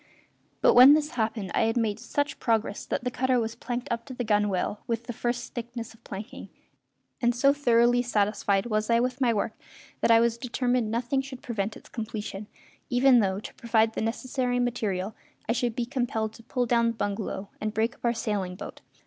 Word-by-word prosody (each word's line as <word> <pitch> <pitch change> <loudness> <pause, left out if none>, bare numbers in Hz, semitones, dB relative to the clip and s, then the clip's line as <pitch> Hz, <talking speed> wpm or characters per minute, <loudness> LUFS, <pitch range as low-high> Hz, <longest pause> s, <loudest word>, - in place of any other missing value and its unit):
But - - +6
when 260 +4 +9
this 300 0 0
happened 220 -5 -2
I - - +3
had 225 +2 0
made 220 -3 0
such 290 0 -2
progress 220 -3 0
that - - -2
the 250 - -1
cutter 255 0 +1
was 225 -1 -2
planked 245 +1 -4
up 235 0 -1
to 260 - -8
the 245 - -2
gunwale 205 -2 +1
with 230 -1 -1
the 240 - -6
first 240 +1 -3
thickness 240 -1 -6
of 225 - -22
planking; 215 +7 -8 0.7
and 240 -1 +2
so 275 +3 +4
thoroughly 245 -3 +3
satisfied 205 -3 +1
was 215 -1 -1
I 230 0 +4
with 250 +2 -1
my 245 -2 +4
work 215 0 -1 0.5
that - - +1
I 230 0 +7
was 235 0 +1
determined 245 -2 0
nothing 240 +4 0
should 270 -2 -10
prevent 215 -3 -3
its - - -16
completion, 215 -2 -5 0.4
even 250 0 +5
though, 195 -2 +1
to - - -9
provide 225 -1 +1
the - - -3
necessary 245 +2 -1
material, 215 -5 -1 0.3
I - - +1
should 235 -1 0
be 240 - -1
compelled 235 -4 -2
to 230 - -13
pull 250 +1 -1
down 235 0 +3
the 230 - 0
bungalow 200 -1 -3
and 215 0 -1
break 225 +2 0
up - - -25
our 235 - +4
sailing 200 -5 -2
boat. 190 - -9
235 Hz, 200 wpm, -27 LUFS, 215-245 Hz, 0.7 s, when